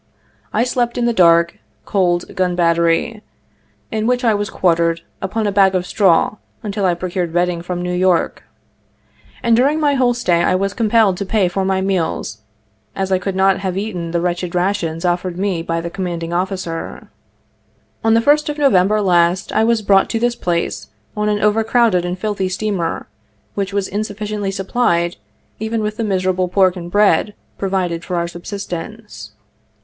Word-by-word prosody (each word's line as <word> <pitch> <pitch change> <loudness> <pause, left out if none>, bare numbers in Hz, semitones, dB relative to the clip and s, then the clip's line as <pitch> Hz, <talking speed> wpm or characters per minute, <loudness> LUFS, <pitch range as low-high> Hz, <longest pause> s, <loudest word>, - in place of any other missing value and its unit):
I 220 - +2
slept 245 -1 -1
in 240 - +1
the 235 - +2
dark, 170 -3 +4 0.3
cold 175 -4 0
gun 180 -1 0
battery, 170 +4 +1 0.7
in 220 0 -1
which 250 +1 +1
I 230 -2 +4
was 205 0 -2
quartered, 170 -2 +1 0.2
upon 215 +3 -2
a 205 - +1
bag 195 -1 +4
of 180 -1 0
straw 195 0 +2 0.3
until 205 -1 -2
I 175 -2 +2
procured 175 -1 -3
bedding 175 0 0
from 175 0 -4
New 180 0 -2
York; 180 -1 +1 1.0
and 235 -1 +4
during 280 +6 +2
my 295 -2 +2
whole 250 -3 +2
stay 175 -8 +1
I - - +2
was 195 +1 -1
compelled 220 -4 +2
to 200 - -3
pay 200 -2 +2
for 190 +2 -2
my 190 0 0
meals, 170 - -2 0.6
as 190 0 -2
I 185 - +3
could 190 +1 -3
not 190 0 +3
have 190 -1 -3
eaten 190 -5 -3
the 170 +1 -1
wretched 175 0 -2
rations 175 -2 -1
offered 175 0 -1
me 190 -3 -1
by 165 0 -2
the 170 0 -5
commanding 170 -3 -4
officer. 180 -2 -4 0.9
On 225 0 +4
the 230 - +4
1st 295 +4 +3
of 295 - -3
November 210 -7 +3
last 175 -1 +2
I 220 - +2
was 225 -1 +2
brought 195 -1 +4
to 225 - -1
this 240 +1 +1
place 170 -5 -2 0.3
on 210 0 0
an 205 -1 0
over 210 +1 +3
crowded 225 -6 +2
and 180 +1 -3
filthy 195 -1 -2
steamer, 190 -3 -2 0.5
which 200 -1 -2
was 200 -1 -1
insufficiently 210 0 -3
supplied 190 -3 0 0.4
even 220 +1 -2
with 210 0 -3
the 230 - -1
miserable 185 -2 0
pork 185 0 +3
and 175 -1 -7
bread 205 +1 +2 0.2
pro 195 - -1
vided 175 -3 -1
for 180 - -4
our 170 0 0
subsistence. 175 - -7
190 Hz, 175 wpm, -18 LUFS, 175-215 Hz, 1.0 s, dark